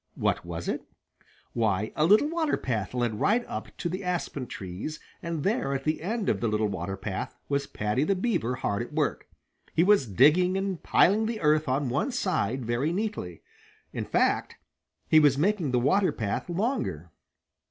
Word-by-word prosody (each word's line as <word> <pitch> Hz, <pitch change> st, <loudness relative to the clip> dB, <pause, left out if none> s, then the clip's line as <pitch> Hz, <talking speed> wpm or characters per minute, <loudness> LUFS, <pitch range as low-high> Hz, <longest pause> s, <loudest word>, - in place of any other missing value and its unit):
What -, -, 0 dB
was 85 Hz, 0 st, -6 dB
it? -, -, -1 dB, 0.7 s
Why 110 Hz, -2 st, 0 dB
a 155 Hz, -, +3 dB
little 210 Hz, -, +5 dB
water 325 Hz, -1 st, 0 dB
path 115 Hz, -2 st, -3 dB
led 120 Hz, -4 st, -1 dB
right 240 Hz, +3 st, +2 dB
up -, -, -5 dB
to 175 Hz, -, -2 dB
the 185 Hz, +3 st, -4 dB
aspen 175 Hz, -7 st, -3 dB
trees, 95 Hz, +11 st, -6 dB, 0.2 s
and 165 Hz, -3 st, -3 dB
there, 195 Hz, -, 0 dB
at 135 Hz, -, -3 dB
the 155 Hz, +1 st, -1 dB
end 215 Hz, +4 st, -2 dB
of -, -, +1 dB
the 120 Hz, -, +1 dB
little 105 Hz, 0 st, +1 dB
water 95 Hz, -1 st, -4 dB
path, 95 Hz, 0 st, -4 dB
was 140 Hz, 0 st, -1 dB
Paddy 105 Hz, +6 st, -1 dB
the 195 Hz, +5 st, +1 dB
Beaver 180 Hz, -, 0 dB
hard 105 Hz, -4 st, -1 dB
at 120 Hz, -, -7 dB
work. 150 Hz, -2 st, -1 dB, 0.5 s
He 165 Hz, -, +5 dB
was 200 Hz, -, +4 dB
digging 155 Hz, -, +4 dB
and 195 Hz, -3 st, -2 dB
piling 215 Hz, +4 st, +3 dB
the 225 Hz, -1 st, -3 dB
earth 150 Hz, -1 st, +3 dB
on 135 Hz, +2 st, +1 dB
one 140 Hz, -, 0 dB
side 130 Hz, -, -1 dB
very 120 Hz, +7 st, 0 dB
neatly. 185 Hz, -, -4 dB, 0.5 s
In -, -, -3 dB
fact, -, -, +1 dB, 0.5 s
he 155 Hz, -, +6 dB
was 145 Hz, -3 st, +4 dB
making 180 Hz, -1 st, +1 dB
the 125 Hz, -, +1 dB
water 185 Hz, +10 st, +3 dB
path 105 Hz, -, -3 dB
longer. 175 Hz, -, -2 dB
150 Hz, 180 wpm, -27 LUFS, 115-190 Hz, 0.7 s, he